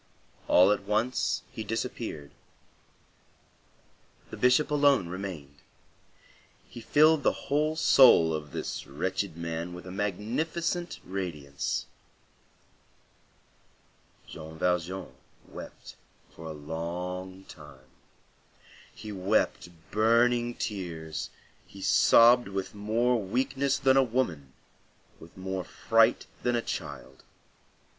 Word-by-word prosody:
All 90 +3 +6
at 105 - +1
once 110 +5 0
he 115 -4 -6
disappeared. 110 - -5 2.0
The - - -6
Bishop 125 +5 +3
alone 140 -10 +3
remained; 90 -7 -7 1.1
he 120 - -10
filled 155 +6 +4
the - - -1
whole 155 +2 +2
soul 125 - +6
of 75 -1 -5
this - - -5
wretched 95 +5 -3
man 85 +1 -4
with 90 - -10
a 90 - -8
magnificent 130 - -2
radiance. 80 -6 -4 2.4
Jean 80 +1 -10
Valjean 90 -2 -1 0.3
wept - - -11 0.4
for 80 - -12
a - - -5
long 90 +5 -6
time. 75 -7 -14 1.1
He 105 - -8
wept 95 -2 0 0.2
burning 120 +2 +3
tears, 80 -7 -5 0.4
he 100 - -13
sobbed 120 +4 +5
with 95 -1 -4
more 115 +3 +1
weakness 130 +6 0
than 135 0 +3
a 135 - +6
woman, 90 - -2 0.7
with 85 - -15
more 95 0 -4
fright 115 +6 +2 0.2
than 120 0 +1
a 120 - +1
child. 65 0 -7
95 Hz, 100 wpm, -28 LUFS, 85-120 Hz, 2.4 s, All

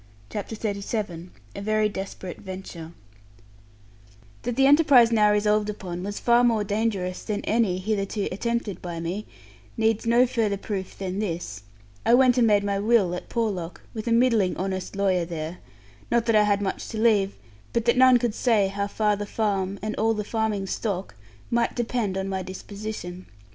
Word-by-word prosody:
CHAPTER 210 +2 -4
XXXVII 200 -4 -3 0.3
A - - -5
VERY 215 +1 +2
DESPERATE 190 -3 -6
VENTURE 185 -4 -8 1.5
That 245 -1 -3
the 270 +1 +4
enterprise 280 -5 +6
now 210 -2 +4
resolved 210 0 +2
upon 180 -4 -5
was 205 +2 -4
far 240 0 +4
more 230 -3 +3
dangerous 200 -3 -1
than 210 -2 -2
any 215 -5 +2
hitherto 200 +1 -2
attempted 225 -1 -2
by 170 -2 -5
me, 180 +6 -4 0.5
needs 225 0 +1
no 240 +2 +5
further 225 -5 0
proof 195 -1 -5
than 190 0 -3
this: 165 - -4 0.4
I 235 - +5
went 250 -1 +5
and 235 - +5
made 205 -2 +4
my 200 -1 0
will 205 -4 +3
at 180 - -6
Porlock, 195 -7 -2
with 220 0 -6
a - - +1
middling 230 -5 +3
honest 190 0 -3
lawyer 190 -3 +2
there; 165 0 -5 0.5
not 235 -1 +2
that 230 - +2
I 210 0 +6
had 205 -1 +1
much 190 - -3
to 225 - -5
leave, 210 -3 +3 0.4
but 235 -1 0
that 235 - +4
none 255 0 +7
could 240 -2 -1
say 215 -5 +2
how 200 +1 -2
far 210 0 +1
the 205 0 -5
farm, 200 -3 -1
and 215 0 -2
all 225 +1 +2
the 210 - -2
farming 215 -2 -1
stock, 195 -1 -3 0.4
might 235 0 +1
depend 230 -5 -1
on 190 0 -2
my 190 -1 -2
disposition. 185 -1 -7
210 Hz, 175 wpm, -25 LUFS, 190-230 Hz, 1.5 s, none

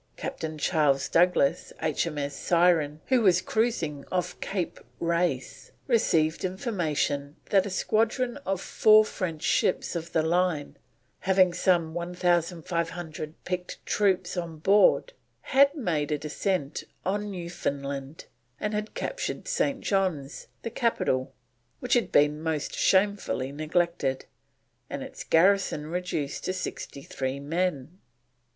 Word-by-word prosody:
Captain 160 - -5
Charles 145 -4 +2
Douglas, 175 -5 +2
H.M.S. 150 -2 -1
Syren, 165 -4 +2
who 260 -2 +4
was 185 -4 +5
cruising 180 -8 -1
off 180 -1 -2
Cape 190 -4 -3 0.2
Race, 170 -6 -1
received 165 - +2
information 160 - -1 0.2
that 195 0 +4
a - - -4
squadron 230 +6 0
of 195 -10 -2
four 215 +2 +5
French 165 -7 -4
ships 185 - +1
of 170 0 -4
the 160 - +2
line, 170 -2 0 0.4
having 185 -2 +3
some 170 -2 +2
1500 170 -2 -2
picked 180 -1 -3
troops 195 -3 +1
on 170 -3 -4
board, 200 - +4 0.3
had 280 +2 +4
made 160 - -1
a 150 - +1
descent 150 +1 -2 0.2
on 205 +2 -1
Newfoundland, 140 -6 -4 0.3
and 210 0 -2
had 210 +1 -3
captured - - -4
St. 285 - 0
John's, 180 -8 -1 0.2
the 230 - -4
capital, 175 - 0 0.5
which - - -1
had 240 - +2
been 150 +1 +3
most 160 -2 -2
shamefully 190 -9 +1
neglected, 155 -2 -1 0.6
and - - -4
its - - -8
garrison 180 -3 +3
reduced 160 -3 -3
to 185 - -1
63 140 -6 -5
men. 165 +1 -2
175 Hz, 120 wpm, -27 LUFS, 150-195 Hz, 0.6 s, was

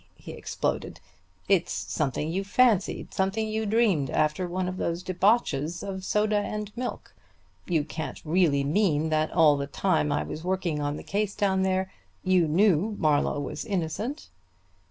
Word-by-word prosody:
he - - -10
exploded. - - -3 0.5
"It's 190 -3 +2
something 150 +1 -2
you 190 +3 -1
fancied, 220 0 +2
something 195 +3 0
you 220 0 -2
dreamed 200 - +2
after 155 +4 0
one 180 +1 -2
of 185 0 -4
those 170 0 -2
debauches 180 - +1
of 190 -1 -5
soda 210 +2 +1
and 210 +1 -4
milk. 250 +1 -5 0.5
You 165 -4 +1
can't 155 +1 -6
really 155 -4 +2
mean 155 0 +1
that 155 0 +1
all 155 -4 +5
the 140 0 -3
time 160 -2 +1
I 145 - 0
was 155 - -7
working 180 -4 -1
on 145 0 -2
the - - -8
case 205 0 -2
down 195 -2 +1
there 190 0 0 0.3
you 185 -3 +3
knew 195 +4 +3
Marlowe 145 -1 +2
was 140 - -5
innocent." 205 - -3
185 Hz, 155 wpm, -27 LUFS, 155-205 Hz, 0.5 s, all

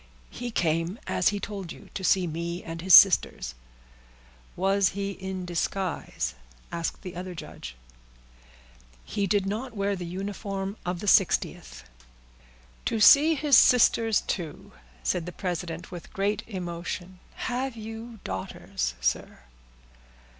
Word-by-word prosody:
"He 245 0 -5
came, 165 -1 0
as - - +1
he 205 -1 +2
told 195 -4 -6
you, - - -12
to 190 - -5
see 185 0 +3
me 170 +2 -4
and 165 0 -6
his 185 +1 +8
sisters." 180 - +6 1.0
"Was 195 +1 +3
he 200 0 -2
in 190 -1 -5
disguise?" 175 - -2 0.4
asked 170 -1 -3
the 180 -1 -7
other 180 0 -6
judge. 65 - -8 1.3
"He 200 - -1
did 200 0 +2
not 225 +5 -4
wear 200 0 0
the 180 -2 -6
uniform 195 +1 -4
of 180 -1 -2
the - - -5
60th." 170 - +2 1.0
"To 225 - 0
see 300 +8 +8
his 290 -1 +4
sisters, 230 -3 +5
too!" 165 -6 -5 0.3
said 160 - -1
the - - -4
president 175 -2 -4
with 175 -2 -9
great 205 +2 0
emotion. 180 -1 -5 0.2
"Have 250 0 -3
you 225 +1 -8
daughters, 80 -9 -4
sir?" 60 0 -1
190 Hz, 130 wpm, -27 LUFS, 170-205 Hz, 1.3 s, his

